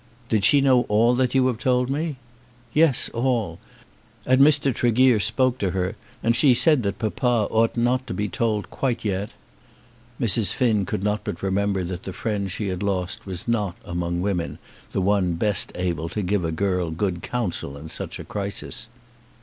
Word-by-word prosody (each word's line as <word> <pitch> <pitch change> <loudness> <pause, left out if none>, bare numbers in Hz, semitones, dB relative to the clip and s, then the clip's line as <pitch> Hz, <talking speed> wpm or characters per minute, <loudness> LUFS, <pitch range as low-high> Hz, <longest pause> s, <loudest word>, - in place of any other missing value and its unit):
"Did 110 -3 +1
she 145 - +6
know 130 -2 +5
all 115 +4 +4
that 125 0 +1
you 130 -1 +4
have 125 -3 0
told 125 -1 +1
me?" 150 +3 -2 0.6
"Yes; 155 -4 +3
all. 115 -8 -1 0.7
And 130 +1 +4
Mr. 140 -2 +4
Tregear 120 0 +3
spoke 130 +6 +1
to 100 - 0
her, 90 0 -1 0.3
and 115 0 +3
she 130 -1 +5
said 150 +1 +4
that 100 -3 -2
papa 115 0 0
ought 115 +1 +2
not 125 +2 +1
to - - -4
be 105 0 -1
told 105 -3 -2
quite 125 -4 -2
yet." 100 0 -2 0.8
Mrs. 115 -3 +2
Finn 110 -7 +1
could 95 - -3
not 105 +1 0
but - - -5
remember 95 0 0
that 90 0 -5
the 95 - -7
friend 100 -2 -2
she 100 +2 -3
had 90 -1 -4
lost 100 +2 -2
was 95 +2 -6
not, 105 -5 -1
among 85 0 -2
women, 90 -4 -2 0.3
the - - -1
one 95 -2 +2
best 100 +4 +1
able 85 -3 -2
to 105 +4 -3
give 95 0 0
a 80 - -1
girl 90 0 0
good 85 +2 -2
counsel 95 - -3
in 80 +3 -9
such - - -5
a - - -6
crisis. 100 +3 -5
105 Hz, 180 wpm, -23 LUFS, 95-125 Hz, 0.8 s, she